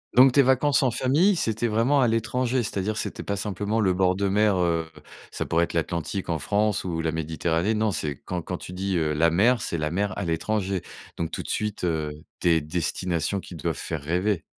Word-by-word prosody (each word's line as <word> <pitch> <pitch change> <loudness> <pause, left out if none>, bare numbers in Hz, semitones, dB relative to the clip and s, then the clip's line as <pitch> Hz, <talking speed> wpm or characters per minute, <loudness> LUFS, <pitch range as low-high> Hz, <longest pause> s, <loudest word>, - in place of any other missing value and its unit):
Donc, 130 +1 +8
tes 140 - +5
vacances 135 +2 +3
en 130 - +3
famille, 150 - +3
c'était 115 -5 0
vraiment 115 +6 +2
à 125 - +4
l'étranger, 120 +2 0
c'est 105 - -4
à - - +1
dire, 110 +2 -2
c'était - - -3
pas 100 - -2
simplement 105 +2 -2
le 95 -4 +3
bord 90 0 +2
de 100 +1 0
mer, 105 0 +3
heu, 85 -2 0 0.4
ça - - -4
pourrait 85 +1 +2
être - - -10
l'Atlantique 85 +3 -2
en 80 -2 0
France 105 +5 +1
ou 85 -3 -3
la 80 0 0
Méditerranée. 80 +5 -1
Non, 110 0 +1
c'est 75 -6 -2
quand 90 -1 -3
quand 90 +2 -5
tu 90 - -9
dis, 95 0 -1
heu: 75 -2 0
«La 85 +2 +3
mer», 110 +8 +3
c'est 85 - -2
la 75 0 -2
mer 100 +2 -1
à 100 - -2
l'étranger. 95 +2 -1 0.4
Donc, 85 -1 -2
tout - - -5
de - - -10
suite, 105 -3 -2
heu, 80 -3 -1 0.3
des 85 -2 +4
destinations 85 +3 -1
qui 90 - -10
doivent 80 - -2
faire 80 -3 -4
rêver. 90 +5 0
95 Hz, 220 wpm, -25 LUFS, 85-110 Hz, 0.4 s, Donc